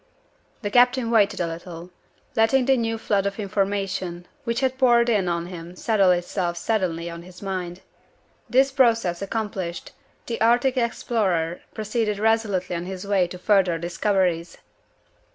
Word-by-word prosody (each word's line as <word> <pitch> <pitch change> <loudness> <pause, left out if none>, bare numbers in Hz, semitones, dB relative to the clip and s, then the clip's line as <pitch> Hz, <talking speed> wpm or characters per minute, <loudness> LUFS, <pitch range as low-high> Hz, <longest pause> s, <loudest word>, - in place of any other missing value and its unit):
The 205 - -2
captain 245 0 +4
waited 210 -3 +3
a 175 - +1
little 170 +1 -8 0.4
letting 230 +4 +3
the 270 +1 +4
new 225 -2 -1
flood 200 -3 0
of 200 +2 -5
information 195 -3 -2 0.2
which 235 +1 -1
had 260 -1 0
poured 240 -2 +4
in 205 -5 +2
on 170 0 -1
him 175 -1 -9
settle 200 -1 +2
itself 175 0 0
steadily 170 -4 -1
in 170 0 -7
his 180 +2 -13
mind. 185 -2 -4 0.7
This 265 +2 +4
process 230 -9 +2
accomplished, 195 -4 -4 0.3
the 230 - -4
Arctic 240 +3 +3
explorer 200 -8 0
proceeded 215 -1 -1
resolutely 210 -5 +1
on 170 +1 -4
his 190 0 -6
way 195 -3 +2
to 180 - -8
further 185 -3 +2
discoveries. 175 0 -1
195 Hz, 145 wpm, -24 LUFS, 175-225 Hz, 0.7 s, captain